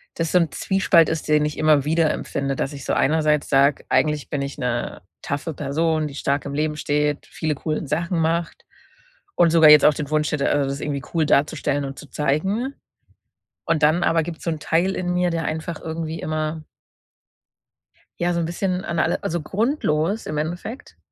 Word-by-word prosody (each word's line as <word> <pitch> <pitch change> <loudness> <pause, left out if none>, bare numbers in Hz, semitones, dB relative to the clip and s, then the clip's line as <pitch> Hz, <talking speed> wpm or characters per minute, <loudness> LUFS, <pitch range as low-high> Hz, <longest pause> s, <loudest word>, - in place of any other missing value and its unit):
das 165 -1 -2
so 180 - +5
'n 165 -3 0
Zwiespalt 190 -4 +3
ist, 160 -1 -3
den 150 -1 +3
ich 150 - -4
immer 155 -3 +4
wieder 160 +1 +2
empfinde, 135 -1 -3
dass 135 - -3
ich 140 - -8
so - - -1
einerseits 150 0 +2
sage, 140 0 +3
eigentlich 150 +3 +1
bin 145 - -1
ich 140 0 -5
'ne 120 -1 -3 0.2
toughe 145 +3 -3
Person, 155 +2 0
die 140 - -9
stark 140 0 -1
im 140 0 -5
Leben 150 0 -1
steht, 150 0 -1
viele 155 -1 -2
coolen 155 +2 -3
Sachen 170 +4 -1
macht 165 +1 -1 0.7
und 170 -2 +4
sogar 160 -2 +7
jetzt 150 -1 +8
auch 150 - +6
den 145 -2 -4
Wunsch 155 0 0
hätte, 145 -2 0
also, 140 -2 +1
das 140 +1 -4
irgendwie 140 -2 -3
cool 165 -2 +2
darzustellen 145 -1 +1
und 135 0 -7
zu 145 - -12
zeigen. 190 - -1 0.9
Und 160 -2 0
dann 155 +4 +4
aber 165 -1 +2
gibt's 165 -1 -7
so 170 - 0
'n 160 - -3
Teil 170 +5 +1
in 180 -1 -2
mir, 180 0 +1
der 165 -1 -2
einfach 160 +2 -4
irgendwie 160 0 -4
immer 155 0 -3 1.6
ja, 175 0 +1
so 170 - 0
'n 170 - 0
bisschen 180 +2 -2
an 170 -1 -2
alle - - 0
also, 170 0 -2
grundlos 200 - 0
im 150 - -4
Endeffekt, 175 - -5
155 Hz, 195 wpm, -22 LUFS, 145-170 Hz, 1.6 s, jetzt